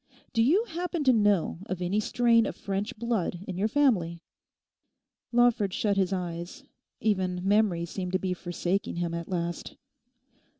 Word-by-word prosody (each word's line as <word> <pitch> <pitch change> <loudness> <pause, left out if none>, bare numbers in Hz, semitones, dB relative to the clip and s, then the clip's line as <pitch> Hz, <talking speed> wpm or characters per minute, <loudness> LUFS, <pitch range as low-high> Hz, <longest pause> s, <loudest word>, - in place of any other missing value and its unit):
Do 225 - +3
you 330 - +4
happen 345 -3 -3
to 260 -2 +5
know 205 -7 +2
of 185 - -3
any 180 +4 0
strain 230 0 +3
of - - -5
French 200 +2 -3
blood 215 -6 -1
in 185 - -4
your 195 +4 +1
family?' 205 - +1 1.1
Lawford 235 -5 +3
shut 205 -2 +1
his 195 -1 +1
eyes, 175 +7 -4 0.4
even 185 -3 0
memory 200 -5 +3
seemed 180 +1 -5
to - - +4
be 185 -1 -2
forsaking 175 +2 -2
him 170 -1 -2
at 170 0 -5
last. 175 -2 -3
195 Hz, 155 wpm, -28 LUFS, 175-230 Hz, 1.1 s, to